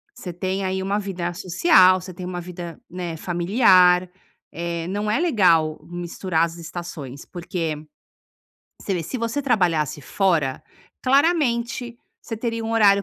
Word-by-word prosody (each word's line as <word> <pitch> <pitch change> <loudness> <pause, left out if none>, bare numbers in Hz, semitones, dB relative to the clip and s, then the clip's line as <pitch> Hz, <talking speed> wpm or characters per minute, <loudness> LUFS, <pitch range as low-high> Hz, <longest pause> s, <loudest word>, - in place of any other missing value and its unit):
você 180 - -7
tem 190 +2 -2
aí 190 0 -1
uma 200 +2 0
vida 180 -4 -4
social 185 - +4
você 185 +1 -9
tem 180 +1 -7
uma 180 -1 -4
vida, 175 -1 -8
né, 175 -2 -5
familiar, 180 0 +4 0.4
eh, 170 0 -3
não 205 +2 -2
é 220 - +2
legal 175 - +3
misturar 175 -1 -1
as 170 0 -8
estações. 160 -5 -7
Porque 170 -2 -4 1.1
você 195 - -2
vê, 175 - -2
se 210 +11 -5
você 230 +5 -2
trabalhasse 175 - +1
fora, 160 -5 0 0.4
claramente 250 -5 +1 0.2
você 225 - -5
teria 230 0 -3
um 225 - -2
horário 200 -3 +5
185 Hz, 145 wpm, -23 LUFS, 170-215 Hz, 1.1 s, horário